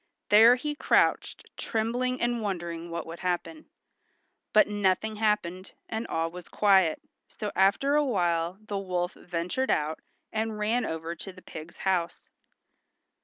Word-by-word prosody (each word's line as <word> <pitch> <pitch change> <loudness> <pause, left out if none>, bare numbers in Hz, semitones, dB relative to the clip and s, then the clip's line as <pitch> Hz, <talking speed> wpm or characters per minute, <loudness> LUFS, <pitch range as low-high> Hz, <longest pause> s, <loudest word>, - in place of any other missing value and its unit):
There 225 +4 +8
he 295 +4 -3
crouched, 295 - +1
trembling 245 +3 -1
and 240 -1 0
wondering 170 -4 -4
what 170 -1 -4
would 165 +1 -8
happen. 185 - -3 0.8
But 215 - +6
nothing 205 +1 0
happened, 200 -4 -1
and 225 +1 -4
all 165 0 -1
was 180 -1 -10
quiet, 190 -6 +4 0.3
so 210 -1 -5
after 200 +9 +3
awhile 180 - +1
the 205 -2 -4
wolf 180 -2 -2
ventured 175 +9 -3
out 155 +1 0 0.3
and 220 0 -1
ran 220 +4 0
over 160 +1 -4
to 195 - -7
the 185 0 -16
pig's 160 +2 -10
house. 180 -3 -1
195 Hz, 135 wpm, -28 LUFS, 170-220 Hz, 0.8 s, There